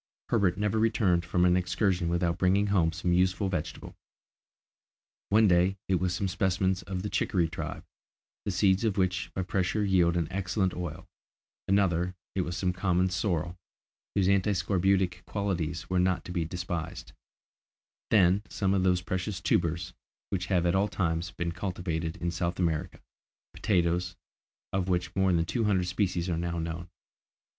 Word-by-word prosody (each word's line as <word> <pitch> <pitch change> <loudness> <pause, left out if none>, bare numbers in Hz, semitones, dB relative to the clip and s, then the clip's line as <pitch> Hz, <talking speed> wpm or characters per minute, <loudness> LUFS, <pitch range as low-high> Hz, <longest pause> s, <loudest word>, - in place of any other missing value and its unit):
Herbert 100 -5 +2
never 105 +1 0
returned 105 -6 +2
from 90 +1 +1
an 90 0 +4
excursion 90 -1 +1
without 85 0 0
bringing 95 +2 +3
home 90 -5 +2
some 85 +2 -1
useful 90 +2 +2
vegetable. 85 -3 -5 1.3
One 110 +1 +5
day, 90 +1 +3
it 95 -2 +2
was 90 -1 0
some 95 +2 -1
specimens 95 0 0
of 90 0 -5
the 105 - -2
chicory 85 -4 +1
tribe, 85 - -6 0.6
the - - -3
seeds 95 +1 +2
of 110 -4 0
which 95 -1 0
by 95 - -1
pressure 95 +3 0
yield 90 -3 +3
an 85 -3 0
excellent 95 0 0
oil; 85 +1 -6 0.6
another, 90 -2 +2 0.2
it 95 - 0
was 85 0 -3
some 90 -1 0
common 90 0 +1
sorrel, 90 -2 -1 0.6
whose 100 -2 +3
anti 100 +1 +3
scorbutic 95 -1 +1
qualities 85 -6 -2
were 90 0 +1
not 90 0 +1
to - - -7
be 85 -2 -1
despised; 85 -1 -5 1.0
then, 95 -2 +4
some 95 -1 0
of 95 - +2
those 90 -1 +2
precious 95 +1 -3
tubers, 85 +2 0 0.4
which 95 -1 -2
have 90 -3 +2
at 85 - +2
all 95 +2 +2
times 85 -3 -1
been 85 0 -3
cultivated 85 -3 -3
in 85 -1 -2
South 85 +1 -2
America, 80 -4 -1 0.5
potatoes, 90 -3 0 0.6
of 95 -1 0
which 90 -1 -1
more 95 -1 +3
than 85 -2 +2
two 95 +7 -1
hundred 95 -3 +2
species 90 -1 -1
are 85 -2 -1
now 85 0 -2
known. 85 +1 -4
90 Hz, 160 wpm, -29 LUFS, 85-95 Hz, 1.3 s, One